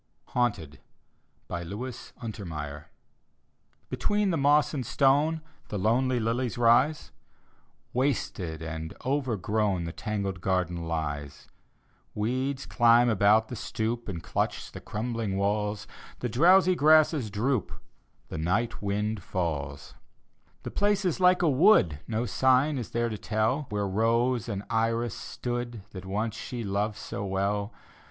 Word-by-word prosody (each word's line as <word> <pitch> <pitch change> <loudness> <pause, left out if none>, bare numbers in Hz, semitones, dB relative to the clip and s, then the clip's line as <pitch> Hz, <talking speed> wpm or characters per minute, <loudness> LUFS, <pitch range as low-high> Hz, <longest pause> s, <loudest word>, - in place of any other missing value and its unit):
HAUNTED: 105 - -1 0.7
look 100 +9 -5 0.3
untermeyer 75 -9 -6 1.1
Between 205 -2 +1
the - - +1
moss 145 +1 +3
and 135 -4 -2
stone 145 +6 +2 0.3
The 105 - -4
lonely 120 +5 +2
lilies 120 +2 -1
rise; 120 +6 +3 0.8
Wasted 100 - -1
and 80 0 -5
overgrown 110 -8 0
The 85 - -4
tangled 100 -2 -3
garden 90 -3 -1
lies. 75 -3 -4 0.7
Weeds 130 +5 -1
climb 120 0 +5
about 110 +1 +4
the 125 - -5
stoop 115 +1 -3
And 85 -4 -5
clutch - - -2
the - - -9
crumbling 110 -3 -3
walls; 105 +1 -1 0.3
The 125 - -3
drowsy 180 - +5
grasses 155 -6 +4
droop— 110 +3 -1 0.6
The - - -5
night 105 +8 0
wind 105 +1 -1
falls. 75 -6 -3 0.7
The - - -5
place 205 -1 +1
is 180 -1 0
like 180 0 +4
a - - +4
wood; 130 - +5
No 115 +2 -1
sign 130 +3 +3
is 120 - -5
there 120 0 0
to 105 -2 -5
tell 110 +7 0
Where 105 -1 -1
rose 115 +4 +1
and 100 -2 -3
iris 115 0 0
stood 120 -3 -5
That 95 -1 -8
once 105 +3 -2
she 120 +1 -5
loved 105 +1 -1
so - - -5
well. 100 +2 -1
110 Hz, 130 wpm, -28 LUFS, 100-130 Hz, 1.1 s, climb